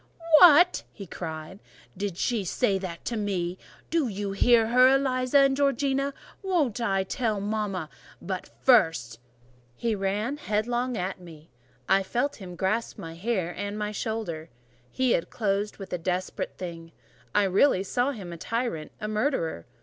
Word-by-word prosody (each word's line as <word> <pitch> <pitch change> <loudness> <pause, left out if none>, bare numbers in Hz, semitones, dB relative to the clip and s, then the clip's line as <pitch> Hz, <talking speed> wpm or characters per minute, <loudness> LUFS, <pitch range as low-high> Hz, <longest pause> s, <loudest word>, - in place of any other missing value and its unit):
what!" 350 +1 +7
he 200 - -9
cried. 160 +2 -7 0.4
"Did 195 -2 -4
she 230 -1 0
say 195 +2 +1
that 180 -3 -7
to 235 - -2
me? 185 -4 -2 0.3
Did 320 -6 +1
you 200 0 -3
hear 225 +2 +4
her, 250 +2 +6
Eliza 265 0 +2
and 275 -1 +4
Georgiana? 275 0 +1 0.3
Won't 320 - 0
I 195 -4 +1
tell 215 +1 -1
mama? 200 -4 -2 0.3
but 185 0 -5
first—" 160 - +3 0.6
He 230 - -1
ran 210 +7 -1
headlong 240 0 -1
at 185 +1 -3
me: 160 -4 -14 0.4
I 195 +1 +4
felt 245 +8 -1
him 180 -3 -9
grasp 205 +6 -1
my 165 -5 -7
hair 180 -1 -2
and 205 +2 -4
my 210 0 -2
shoulder: 210 -7 -4 0.4
he 260 - +1
had 165 - +1
closed 205 -1 -1
with 195 -2 -8
a 180 - -1
desperate 180 +2 -3
thing. 165 -2 -7 0.4
I 205 - +5
really 195 +2 +3
saw 245 +7 0
in 280 - -4
him 180 -5 -7
a - - -7
tyrant, 230 -6 -3
a 210 - -4
murderer. 215 - -1
205 Hz, 155 wpm, -27 LUFS, 185-245 Hz, 0.6 s, what